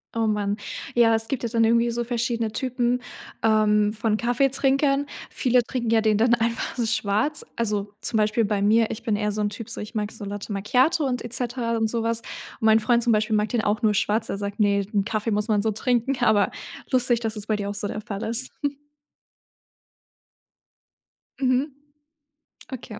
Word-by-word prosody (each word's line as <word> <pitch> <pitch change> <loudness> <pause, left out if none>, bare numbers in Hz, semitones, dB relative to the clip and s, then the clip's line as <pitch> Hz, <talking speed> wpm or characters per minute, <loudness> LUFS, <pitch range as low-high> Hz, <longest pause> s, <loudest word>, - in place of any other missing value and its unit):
Oh, 225 - +1
mann. 210 -1 0 0.4
Ja, 230 -1 +5
es 225 0 +1
gibt 255 0 -3
ja 235 - -1
dann 230 0 +2
irgendwie 235 +1 +3
so 240 +1 -2
verschiedene 235 -2 -2
Typen, 250 0 -1 0.4
ähm, 210 -1 +3
von 220 -1 0
Kaffeetrinkern. 275 +3 +1 0.2
Viele 250 -1 +2
trinken 240 -2 -3
ja 225 -1 +4
den 215 -1 +2
dann 235 +2 +3
einfach 230 0 -1
so 240 - -1
schwarz. 215 +10 0
Also, 210 -3 -2
zum 225 - -1
Beispiel 215 +2 +2
bei 205 -1 0
mir, 220 +2 +3
ich 220 - -6
bin 220 -3 0
eher 210 0 -1
so 210 - -3
'n 205 - +1
Typ, 220 +1 -8
so, - - -5
ich 210 +3 -8
mag 210 -1 -2
so 210 - -8
Latte 205 +1 -6
Macchiato 255 - +2
und 250 -3 -2
et 240 - -6
cetera 240 -2 -1
und 225 -1 +1
so 230 0 -1
was. 230 0 0 0.4
Mein 220 0 +5
Freund 235 +2 +2
zum 235 - +3
Beispiel 215 +1 +1
mag 210 0 +1
den 235 +1 0
auch 210 +3 0
nur 215 -1 +4
schwarz. 215 +2 0
Er 195 - -2
sagt: 205 +1 -5
„Ne, 200 -1 +3
den 200 -1 -1
Kaffee 215 0 -2
muss 210 +1 0
man 210 -3 +2
so 220 - 0
trinken.“, 245 +4 0
aber 215 -3 +3 0.4
lustig, 250 -2 +3
dass 225 -1 -3
es 210 -1 -6
bei 215 - 0
dir 200 -1 -3
auch 205 - -5
so 205 0 -2
der 215 - -5
Fall 205 -2 -6
ist. 235 +3 +4 2.9
Mhm, 260 +3 +2 1.1
okay. 230 -3 -9
225 Hz, 200 wpm, -24 LUFS, 210-240 Hz, 2.9 s, Ja